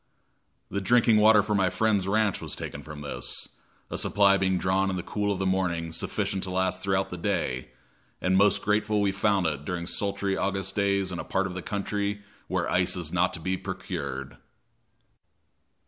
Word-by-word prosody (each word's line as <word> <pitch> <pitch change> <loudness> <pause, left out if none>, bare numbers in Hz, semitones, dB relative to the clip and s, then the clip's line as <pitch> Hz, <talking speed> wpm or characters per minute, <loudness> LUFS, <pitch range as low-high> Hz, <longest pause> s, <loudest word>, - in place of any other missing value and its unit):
The 100 - -1
drinking 115 +2 +4
water 105 -1 +6
for 105 - -1
my 95 -2 +3
friend's 100 0 +1
ranch 105 0 +1
was - - -4
taken - - -6
from 75 -1 -9
this, 70 - -4 0.4
a - - -2
supply 100 -1 +4
being 95 -1 +1
drawn 95 +2 +1
in 95 - -1
the 90 - -3
cool 105 -1 -1
of 100 - -1
the 95 - -1
morning 90 -3 0
sufficient 95 +3 -2
to 95 - -3
last 95 0 0
throughout 95 0 0
the 90 - -5
day, 85 -10 -1 0.5
and 95 0 +1
most 100 +2 +4
grateful 105 +1 +1
we 100 -1 +2
found 100 -2 +1
it 75 -3 -1
during 85 +2 -3
sultry 100 +1 -1
August 95 0 -1
days 100 -2 +1
in 85 - -4
a - - -3
part 95 - 0
of 95 - -4
the 95 - -5
country 100 +1 -2 0.2
where - - -1
ice - - +2
is - - -4
not - - +2
to - - -3
be 95 +3 -1
procured. 70 -5 -5
95 Hz, 190 wpm, -27 LUFS, 90-100 Hz, 0.5 s, water